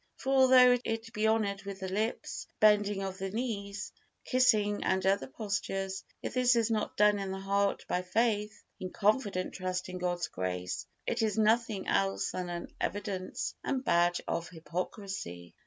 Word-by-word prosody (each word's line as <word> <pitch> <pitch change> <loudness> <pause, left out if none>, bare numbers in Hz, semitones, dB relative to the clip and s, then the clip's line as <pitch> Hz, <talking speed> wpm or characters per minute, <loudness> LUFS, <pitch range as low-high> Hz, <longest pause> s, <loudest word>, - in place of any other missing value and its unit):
For 270 - -1
although 255 -2 +7
it 225 0 -3
be 215 +1 +1
honored 210 -3 +1
with 200 -1 -7
the 190 - -3
lips, 215 +5 -2
bending 205 -2 +4
of 190 -1 -5
the 195 0 -2
knees, 200 -3 -4 0.3
kissing 215 -5 +3
and 190 0 +1
other 195 +1 +2
postures, 195 -5 -3 0.2
if - - -3
this 250 -1 +4
is 230 -1 +2
not 215 -1 -1
done 210 0 +5
in 195 -1 -3
the 190 - -3
heart 200 +1 0
by 180 - 0
faith, 210 +2 0 0.2
in 185 - -4
confident 205 -3 +1
trust 185 -1 -3
in 180 0 -5
God's 175 -2 -1
grace, 90 - -3 0.2
it - - -1
is 220 -2 0
nothing 220 -2 +2
else 95 0 +1
than 180 -1 -4
an 175 0 -6
evidence 200 -2 -3
and 265 -1 -1
badge 175 +1 +3
of 170 0 -2
hypocrisy. 170 - -5
200 Hz, 165 wpm, -31 LUFS, 185-220 Hz, 0.3 s, although